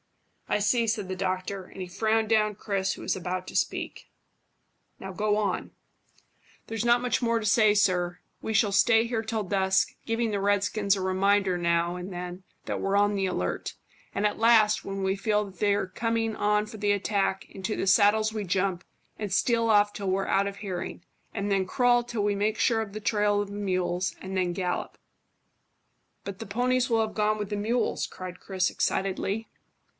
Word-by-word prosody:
"I -, -, +2 dB
see," 230 Hz, +3 st, +2 dB
said 215 Hz, -3 st, -1 dB
the 185 Hz, -, -3 dB
doctor, 185 Hz, +1 st, -2 dB
and -, -, -13 dB
he 185 Hz, -, -4 dB
frowned 220 Hz, +4 st, +1 dB
down 215 Hz, -1 st, +2 dB
Chris, 195 Hz, -2 st, -1 dB
who -, -, -9 dB
was -, -, 0 dB
about 185 Hz, 0 st, -4 dB
to -, -, -9 dB
speak. -, -, -2 dB, 0.9 s
"Now 190 Hz, 0 st, -7 dB
go 210 Hz, +2 st, +1 dB
on." 205 Hz, -3 st, -1 dB, 1.0 s
"There's 225 Hz, -1 st, -3 dB
not 240 Hz, +1 st, +3 dB
much 250 Hz, -, 0 dB
more 230 Hz, -1 st, +1 dB
to 220 Hz, -, -5 dB
say, 215 Hz, 0 st, +5 dB
sir. 180 Hz, -4 st, +1 dB, 0.2 s
We 220 Hz, -, -3 dB
shall 205 Hz, -1 st, +3 dB
stay 225 Hz, +3 st, +4 dB
here 230 Hz, -1 st, -1 dB
till 220 Hz, -1 st, -2 dB
dusk, 190 Hz, -1 st, +1 dB
giving 225 Hz, 0 st, 0 dB
the 200 Hz, -1 st, -1 dB
redskins 205 Hz, 0 st, +2 dB
a -, -, -3 dB
reminder 190 Hz, 0 st, +2 dB
now 170 Hz, 0 st, +1 dB
and 180 Hz, +2 st, -6 dB
then 180 Hz, +1 st, -6 dB, 0.2 s
that -, -, -3 dB
we're 195 Hz, +1 st, +1 dB
on 205 Hz, 0 st, +3 dB
the 195 Hz, -1 st, 0 dB
alert; 90 Hz, -, -3 dB, 0.4 s
and 205 Hz, -, -1 dB
at 210 Hz, -, 0 dB
last, 225 Hz, -2 st, +5 dB
when 195 Hz, 0 st, -4 dB
we 190 Hz, 0 st, +1 dB
feel 210 Hz, +1 st, 0 dB
that 190 Hz, -3 st, -13 dB
they're 205 Hz, -2 st, +1 dB
coming 225 Hz, +2 st, -1 dB
on 210 Hz, 0 st, +1 dB
for 215 Hz, -, -10 dB
the 205 Hz, 0 st, +1 dB
attack, 200 Hz, -1 st, 0 dB
into 195 Hz, +2 st, -4 dB
the -, -, -2 dB
saddles 215 Hz, +2 st, +4 dB
we 215 Hz, -1 st, -3 dB
jump, 185 Hz, -1 st, -1 dB, 0.3 s
and 210 Hz, -3 st, -4 dB
steal 230 Hz, +3 st, +2 dB
off 205 Hz, -1 st, +4 dB
till 200 Hz, -2 st, -3 dB
we're 195 Hz, +1 st, 0 dB
out 200 Hz, +1 st, +2 dB
of 200 Hz, 0 st, -6 dB
hearing, 195 Hz, -3 st, -5 dB, 0.3 s
and 205 Hz, -1 st, -2 dB
then 195 Hz, -1 st, +1 dB
crawl 245 Hz, +4 st, +3 dB
till 235 Hz, -3 st, -3 dB
we 205 Hz, 0 st, +1 dB
make 210 Hz, +2 st, 0 dB
sure 225 Hz, -2 st, +3 dB
of 215 Hz, -2 st, -5 dB
the 215 Hz, -, -6 dB
trail 205 Hz, -1 st, +1 dB
of 205 Hz, -, -5 dB
the -, -, -8 dB
mules, 185 Hz, -2 st, -1 dB
and 190 Hz, 0 st, -6 dB
then 180 Hz, -1 st, +1 dB
gallop." 180 Hz, 0 st, -3 dB, 1.3 s
"But 200 Hz, -1 st, -6 dB
the -, -, -7 dB
ponies 250 Hz, +4 st, +1 dB
will 225 Hz, -1 st, +3 dB
have 215 Hz, -, -8 dB
gone 215 Hz, 0 st, +1 dB
with 210 Hz, -1 st, -5 dB
the -, -, 0 dB
mules," 225 Hz, +4 st, 0 dB
cried 185 Hz, -1 st, -9 dB
Chris 185 Hz, -2 st, 0 dB
excitedly. 195 Hz, +3 st, -1 dB
205 Hz, 195 wpm, -27 LUFS, 190-220 Hz, 1.3 s, say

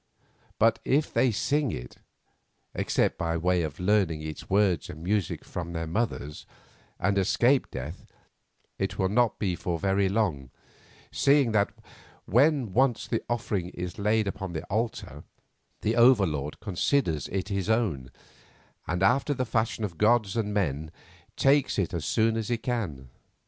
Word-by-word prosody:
But 115 Hz, +1 st, +3 dB
if 145 Hz, +3 st, +1 dB
they 130 Hz, -, +3 dB
sing 140 Hz, +4 st, 0 dB
it, -, -, -7 dB, 0.8 s
except -, -, 0 dB
by 85 Hz, 0 st, -1 dB
way 90 Hz, +1 st, +1 dB
of 75 Hz, -3 st, -4 dB
learning 90 Hz, -5 st, +1 dB
its 80 Hz, 0 st, -7 dB
words 95 Hz, -5 st, +2 dB
and 80 Hz, +2 st, -9 dB
music 100 Hz, -1 st, -1 dB
from 85 Hz, -1 st, -5 dB
their 80 Hz, -1 st, -3 dB
mothers, 80 Hz, -5 st, -3 dB, 0.5 s
and 100 Hz, 0 st, +1 dB
escape 120 Hz, +7 st, +2 dB
death, -, -, -7 dB, 0.7 s
it -, -, -2 dB
will 95 Hz, -, +1 dB
not 120 Hz, +2 st, +2 dB
be 95 Hz, -4 st, -1 dB
for 85 Hz, 0 st, -3 dB
very 95 Hz, +2 st, +1 dB
long, 95 Hz, -, -1 dB, 0.6 s
seeing 140 Hz, -4 st, +3 dB
that 105 Hz, -2 st, +2 dB, 0.5 s
when 130 Hz, -, +2 dB
once 125 Hz, 0 st, +2 dB
the 115 Hz, -, -1 dB
offering 105 Hz, -6 st, -2 dB
is 90 Hz, +2 st, -5 dB
laid 105 Hz, +1 st, +2 dB
upon 95 Hz, -3 st, -5 dB
his 80 Hz, -, -3 dB
altar, 110 Hz, -, -3 dB, 0.6 s
the 110 Hz, +2 st, 0 dB
Over 120 Hz, -3 st, +6 dB
Lord 75 Hz, -3 st, -4 dB
considers 90 Hz, -, 0 dB
it 95 Hz, +1 st, -3 dB
his 100 Hz, 0 st, -2 dB
own, 95 Hz, -, 0 dB, 0.8 s
and, 90 Hz, +3 st, -1 dB
after 135 Hz, +7 st, +3 dB
the 130 Hz, 0 st, -1 dB
fashion 110 Hz, -1 st, -1 dB
of 90 Hz, -6 st, -4 dB
gods 110 Hz, -2 st, +3 dB
and 110 Hz, -3 st, -1 dB
men, 80 Hz, -7 st, -1 dB, 0.5 s
takes 140 Hz, 0 st, +3 dB
it 95 Hz, -4 st, -1 dB
as 85 Hz, -4 st, -3 dB
soon 110 Hz, +7 st, +2 dB
as 110 Hz, -2 st, -2 dB
he 120 Hz, -, +1 dB
can. 100 Hz, -, -4 dB
100 Hz, 155 wpm, -27 LUFS, 85-115 Hz, 0.8 s, Over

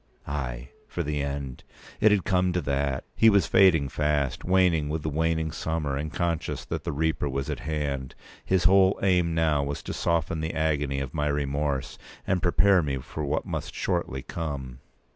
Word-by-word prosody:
Ay, 60 Hz, -4 st, -4 dB, 0.2 s
for -, -, -3 dB
the 75 Hz, -1 st, -2 dB
end! 70 Hz, -2 st, -4 dB, 0.4 s
It 110 Hz, 0 st, +5 dB
had 100 Hz, -3 st, +3 dB
come 90 Hz, -3 st, +1 dB
to 90 Hz, -, 0 dB
that. 70 Hz, -2 st, -1 dB
He 115 Hz, -, +6 dB
was 100 Hz, -2 st, +4 dB
fading 85 Hz, -7 st, +5 dB
fast, 75 Hz, -1 st, -1 dB
waning 90 Hz, -5 st, +3 dB
with 75 Hz, 0 st, -3 dB
the 80 Hz, -, -1 dB
waning 80 Hz, +1 st, 0 dB
summer, 80 Hz, -3 st, -2 dB
and 75 Hz, +2 st, -3 dB
conscious 85 Hz, -2 st, -2 dB
that -, -, -4 dB
the -, -, -1 dB
Reaper 80 Hz, 0 st, 0 dB
was 70 Hz, 0 st, -3 dB
at -, -, -4 dB
hand. 70 Hz, -4 st, -3 dB, 0.3 s
His 95 Hz, -2 st, +1 dB
whole 95 Hz, +1 st, +5 dB
aim 90 Hz, -3 st, +2 dB
now 80 Hz, -3 st, +2 dB
was 70 Hz, 0 st, -4 dB
to -, -, -5 dB
soften 85 Hz, -1 st, 0 dB
the 80 Hz, +1 st, -3 dB
agony 75 Hz, -3 st, 0 dB
of 65 Hz, -1 st, -5 dB
my 75 Hz, -1 st, 0 dB
remorse, 70 Hz, -1 st, -1 dB, 0.3 s
and 90 Hz, -2 st, 0 dB
prepare 95 Hz, +1 st, +4 dB
me 70 Hz, -3 st, -2 dB
for 75 Hz, +4 st, -6 dB
what 70 Hz, -, -1 dB
must -, -, -5 dB
shortly 65 Hz, 0 st, -2 dB
come. 70 Hz, -6 st, -5 dB
75 Hz, 180 wpm, -26 LUFS, 70-85 Hz, 0.4 s, He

